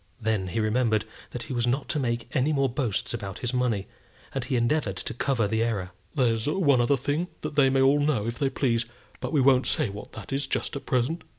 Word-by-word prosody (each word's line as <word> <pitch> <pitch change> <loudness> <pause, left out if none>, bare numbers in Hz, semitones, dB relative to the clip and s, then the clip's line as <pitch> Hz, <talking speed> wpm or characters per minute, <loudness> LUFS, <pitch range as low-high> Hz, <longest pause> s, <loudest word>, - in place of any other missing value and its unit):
Then 110 -4 0
he 105 +6 -2
remembered 110 0 +2 0.2
that 120 - -5
he 130 - -6
was 120 -1 +1
not 130 +3 0
to 150 - 0
make 120 -1 -2
any 140 +2 +3
more 140 -2 +2
boasts 120 -6 -2
about 105 -3 -5
his 125 0 -3
money, 120 -6 +1 0.5
and - - -1
he - - -1
endeavoured 120 -4 +1
to - - -4
cover 120 -2 +1
the 110 +2 0
error. 100 -6 -1 0.2
"There's 115 -2 +2
one 145 -7 +3
other 135 +4 +3
thing 145 +7 -1
they 145 -3 +3
may 135 0 +3
all 140 +2 +5
know 145 -8 +1
if 115 0 -3
they 140 - +2
please, 120 -3 0 0.3
but - - -4
we 150 -4 +3
won't 130 -1 +4
say 150 -9 +1
what 100 +1 -9
that - - -7
is 135 0 -1
just - - -1
at 140 - -6
present." 135 +7 0
125 Hz, 225 wpm, -27 LUFS, 115-140 Hz, 0.5 s, all